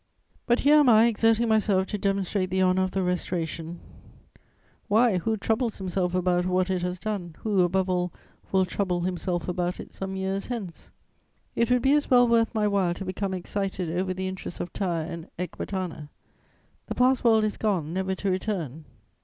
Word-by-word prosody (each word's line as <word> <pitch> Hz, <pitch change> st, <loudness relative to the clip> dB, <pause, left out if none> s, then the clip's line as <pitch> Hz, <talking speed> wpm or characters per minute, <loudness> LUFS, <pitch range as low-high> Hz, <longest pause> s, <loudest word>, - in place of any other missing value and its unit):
But 240 Hz, +1 st, +3 dB
here 295 Hz, +2 st, +6 dB
am 290 Hz, -4 st, +6 dB
I 225 Hz, 0 st, +7 dB
exerting 225 Hz, 0 st, +3 dB
myself 210 Hz, -4 st, +2 dB
to 210 Hz, -, -2 dB
demonstrate 195 Hz, -1 st, 0 dB
the 190 Hz, 0 st, +1 dB
honour 185 Hz, 0 st, +3 dB
of 185 Hz, -, +1 dB
the 190 Hz, 0 st, -1 dB
Restoration: 170 Hz, -2 st, -3 dB, 1.1 s
why, 220 Hz, -2 st, +3 dB
who 220 Hz, +5 st, -1 dB
troubles 225 Hz, +3 st, -1 dB
himself 185 Hz, -1 st, -1 dB
about 180 Hz, 0 st, +1 dB
what 185 Hz, +1 st, +1 dB
it 185 Hz, -1 st, 0 dB
has 180 Hz, +1 st, -2 dB
done, 180 Hz, -5 st, -4 dB
who, 205 Hz, -4 st, +2 dB
above 185 Hz, +2 st, +1 dB
all, 180 Hz, -1 st, 0 dB, 0.4 s
will 190 Hz, -1 st, +3 dB
trouble 180 Hz, -1 st, -1 dB
himself 175 Hz, -1 st, -2 dB
about 180 Hz, 0 st, -2 dB
it -, -, -9 dB
some 190 Hz, 0 st, -5 dB
years 190 Hz, +1 st, -2 dB
hence? 215 Hz, -9 st, -6 dB, 0.7 s
It 235 Hz, 0 st, +1 dB
would 250 Hz, -1 st, +2 dB
be 270 Hz, -, +4 dB
as 295 Hz, 0 st, +1 dB
well 245 Hz, -1 st, +6 dB
worth 230 Hz, -1 st, +3 dB
my 210 Hz, -1 st, +2 dB
while 190 Hz, -4 st, +1 dB
to 195 Hz, -, -6 dB
become 190 Hz, +1 st, -3 dB
excited 185 Hz, -2 st, -3 dB
over 185 Hz, +1 st, -1 dB
the 190 Hz, +1 st, -3 dB
interests 185 Hz, -2 st, -6 dB
of 175 Hz, -, -5 dB
Tyre 170 Hz, -5 st, -1 dB
and 170 Hz, -2 st, -7 dB
Ecbatana: 180 Hz, -3 st, -5 dB, 0.8 s
that -, -, -4 dB
past 255 Hz, 0 st, +3 dB
world 225 Hz, -2 st, +5 dB
is 215 Hz, -1 st, -1 dB
gone, 180 Hz, -8 st, -1 dB
never 190 Hz, +1 st, -1 dB
to 195 Hz, 0 st, -1 dB
return. 170 Hz, -, -3 dB
190 Hz, 185 wpm, -26 LUFS, 180-215 Hz, 1.1 s, I